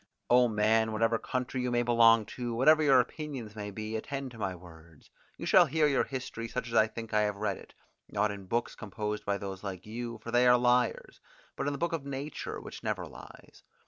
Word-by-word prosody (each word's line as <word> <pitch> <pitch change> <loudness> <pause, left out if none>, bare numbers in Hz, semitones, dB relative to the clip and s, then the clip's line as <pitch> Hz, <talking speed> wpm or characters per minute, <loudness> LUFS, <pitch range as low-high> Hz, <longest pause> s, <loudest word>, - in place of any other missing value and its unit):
O 125 0 +6
man, 110 0 +2
whatever 115 +1 +1
country 125 0 -3
you 125 - -1
may 120 0 +1
belong 115 -2 +5
to, 120 0 -5
whatever 155 +6 +5
your 135 -4 +6
opinions 130 -6 -4
may 105 -1 -5
be, 110 +2 -5
attend 135 +3 -4
to 115 - -12
my 95 -3 -2
words; 85 -3 -16 0.3
you - - -6
shall 175 0 +6
hear 155 +2 +2
your 140 -3 +2
history 125 -3 -5
such 125 +1 -4
as - - -8
I 110 -1 +5
think 115 0 -8
I 105 - +4
have 105 -1 0
read 100 -1 -2
it, - - -15 0.3
not 105 - 0
in 100 -2 -9
books 120 +4 -1
composed 105 0 -5
by 100 0 0
those 95 -1 -7
like 95 -2 -6
you, 115 +2 -5
for 115 - -6
they 120 +1 +4
are 125 0 +7
liars, 125 -1 +1 0.3
but - - -3
in - - +1
the - - -4
book 170 +4 -1
of 160 -4 -2
nature 140 +1 -5
which - - -9
never - - -2
lies. - - -14
115 Hz, 220 wpm, -30 LUFS, 105-125 Hz, 0.3 s, are